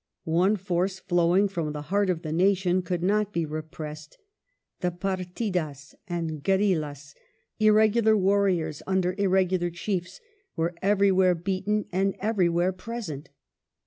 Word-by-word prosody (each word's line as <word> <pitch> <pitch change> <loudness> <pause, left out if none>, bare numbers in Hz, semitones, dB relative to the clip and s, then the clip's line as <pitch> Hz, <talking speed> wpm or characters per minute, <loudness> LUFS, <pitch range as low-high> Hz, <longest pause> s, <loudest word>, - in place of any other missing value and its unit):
One 180 +6 +2
force, 185 0 -1
flowing 180 +1 +2
from 165 -6 -3
the 150 -1 -5
heart 200 -1 +2
of 175 -2 -1
the 155 - -4
nation, 185 +1 +2
could 175 -1 -3
not 210 +2 +1
be 170 -4 -1
repressed. 155 0 -7 0.6
The 180 - 0
partidas 180 - -3
and 165 -4 -4
guerillas^ 155 -8 0 0.5
irregular 215 +1 +4
warriors 185 -6 +1
under 190 -1 +1
irregular 185 -2 +2
chiefs, 180 +1 -4 0.4
were 165 +1 -1
everywhere 190 -2 +3
beaten 195 +4 -1
and 195 +2 0
everywhere 185 -4 +1
present. 185 - -7
185 Hz, 120 wpm, -26 LUFS, 170-195 Hz, 0.6 s, irregular